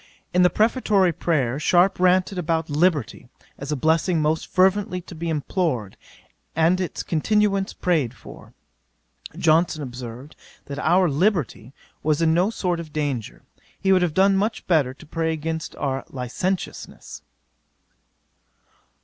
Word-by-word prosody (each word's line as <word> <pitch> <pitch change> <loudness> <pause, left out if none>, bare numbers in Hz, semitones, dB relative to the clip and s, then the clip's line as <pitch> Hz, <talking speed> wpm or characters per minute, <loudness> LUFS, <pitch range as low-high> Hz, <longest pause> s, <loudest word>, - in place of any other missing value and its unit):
In 180 - +4
the 180 - +6
prefatory 210 -5 +2
prayer, 140 -6 0
Sharpe 180 +5 +3
ranted 185 +1 +2
about 160 -2 -1
Liberty, 155 - 0 0.3
as 140 +2 -5
a - - +1
blessing 160 +4 +1
most 155 +1 0
fervently 190 +1 +2
to 175 - -12
be 170 0 -4
implored, 150 - -2 0.6
and 165 +4 +3
its 180 - -4
continuance 195 +3 +1
prayed 150 -9 0
for. - - -14 0.8
Johnson 160 -1 +2
observed, 125 +2 -8 0.3
that 140 0 -6
our 180 +4 +3
liberty 150 - 0 0.3
was 155 -1 +1
in 165 -1 +3
no 180 +5 +2
sort 180 -6 -2
of 160 -2 -8
danger: 145 -7 -3 0.4
he 190 0 +3
would 185 - +4
have 170 -3 0
done 195 +1 +4
much 210 +3 -1
better, 145 -7 +2
to 160 - -15
pray 160 +1 -1
against 160 0 -4
our 135 -2 -2
licentiousness. 140 +9 -4
165 Hz, 135 wpm, -23 LUFS, 150-185 Hz, 0.8 s, the